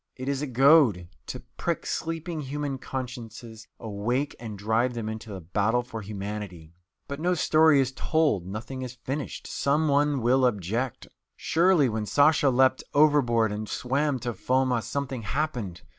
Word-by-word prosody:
It 130 0 -7
is 140 0 -1
a 150 - -2
goad, 130 - +4 0.2
to - - -6 0.2
prick - - -2
sleeping 165 0 -3
human 140 -1 -4
consciences 120 -4 -7
awake 115 +7 -2
and 110 -3 -7
drive 110 +5 0
them 115 -2 -4
into 110 0 -6
the 95 -2 -7
battle 105 +8 0
for 115 -2 -7
humanity. 100 -5 -7 0.3
But 140 0 -5
no 180 +3 +1
story 155 -2 +4
is 135 -1 +1
told, 140 - 0
nothing 110 +7 -6
is 130 -1 -6
finished, 140 +2 -4
some 150 +3 0
one 145 -2 +2
will 130 +2 +3
object. 115 +4 -3 0.3
Surely, 170 -3 +3
when 110 -2 -3
Sasha 145 +2 +4
leaped 130 0 +3
overboard 130 -7 +4
and 105 +1 -5
swam 140 +2 0
to 120 0 -3
Foma, 130 0 +1
something 135 -1 -4
happened. 120 - -3
125 Hz, 155 wpm, -26 LUFS, 110-145 Hz, 0.3 s, goad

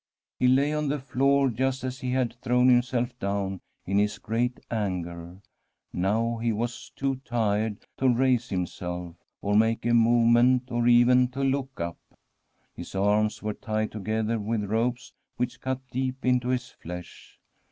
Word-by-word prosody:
He 125 - +4
lay 140 +4 +3
on 150 -1 -1
the 145 +2 0
floor 140 +1 +2
just 130 +3 -1
as 130 +1 -4
he 130 - -4
had 125 -2 0
thrown 125 0 +3
himself 125 0 +2
down 100 -1 -2 0.2
in 100 +2 +1
his 105 0 +1
great 120 +3 -1
anger; 90 -4 -3 0.5
now 110 +6 0
he 115 0 0
was 120 +2 -4
too 135 -1 -1
tired 110 -4 -1
to 130 - +3
raise 125 0 +2
himself, 90 -2 -4 0.3
or 100 +1 +1
make 110 +1 +2
a 120 - +2
movement, 120 +2 +4
or 120 0 +1
even 125 +1 +6
to 135 +2 -4
look 135 -1 -1
up. 85 0 -4 0.7
His 85 - -9
arms 105 +3 +1
were 105 0 -1
tied 110 -1 -2
together 110 +2 -1
with 105 +1 -1
ropes, 120 +5 -1 0.2
which 125 +1 -3
cut 130 0 -2
deep 130 +1 -3
into 125 -1 +2
his 125 -1 -1
flesh. 90 +1 -10
120 Hz, 155 wpm, -27 LUFS, 105-125 Hz, 0.7 s, even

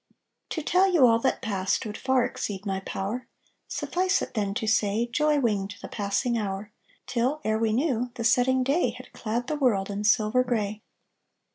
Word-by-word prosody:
To 320 - -3
tell 375 +4 +3
you 320 -8 +6
all 230 -1 +5
that - - 0
passed 195 -2 -1
Would 210 -1 -5
far 260 -1 +2
exceed 200 0 -4
my 195 -1 -1
power; 195 +5 -4 0.4
Suffice 370 +2 0
it, - - -7
then, 200 -3 -1
to 230 - -2
say, 215 +1 +2
Joy 300 +4 +2
winged 205 -5 0
the - - -8
passing 220 +3 -1
hour, 200 0 -4 0.3
Till, 255 +5 0
ere 220 0 0
we 225 -1 +1
knew, 250 -1 0
The 230 - -4
setting 255 +2 +3
day 270 -3 +1
Had 255 - -13
clad 235 +2 -2
the 305 - -2
world 210 -8 +1
In 200 +1 -3
silver 215 +3 +3
grey. 215 -4 -2
230 Hz, 180 wpm, -26 LUFS, 210-255 Hz, 0.4 s, you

